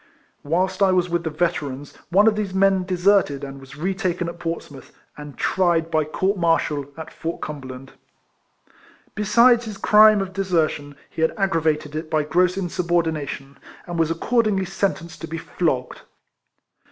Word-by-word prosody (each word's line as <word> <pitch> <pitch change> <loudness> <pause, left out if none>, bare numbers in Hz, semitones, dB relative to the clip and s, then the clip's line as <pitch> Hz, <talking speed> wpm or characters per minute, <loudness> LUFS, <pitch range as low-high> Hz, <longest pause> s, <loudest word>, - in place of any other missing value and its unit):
Whilst 185 +5 -1
I 195 -1 +5
was 180 -1 +1
with 170 0 -1
the - - 0
Veterans, 150 -4 -3 0.2
one 195 +5 +4
of 220 -1 +4
these 205 -3 -3
men 190 -1 +3
deserted 180 -6 +2
and 135 0 -7
was 135 +1 -13
re 180 +5 -1
taken 185 -2 -2
at 170 0 -7
Portsmouth, 165 -5 -6 0.2
and 150 -3 -10
tried 170 -3 +1
by 155 -1 +2
court 190 +6 -1
martal 160 -4 +1
at 160 0 -8
Fort 165 +1 -5
Cumber 145 -3 -6
land. 130 +1 -10 1.2
Besides 235 +3 +4
his 215 -3 -7
crime 215 +1 +6
of 190 -1 -4
desertion 160 -7 -1
he - - -7
had 160 - +1
aggravated 160 -6 0
it 155 0 -4
by 155 -1 +1
gross 180 +4 +1
insubordination, 165 -6 -2 0.3
and 175 - -6
he - - -2
was 160 -1 +2
accordingly 205 +3 +1
sentenced 185 -3 -3
to 165 - -5
be 165 +1 -5
flogged. 145 -7 -2
170 Hz, 165 wpm, -22 LUFS, 150-190 Hz, 1.2 s, crime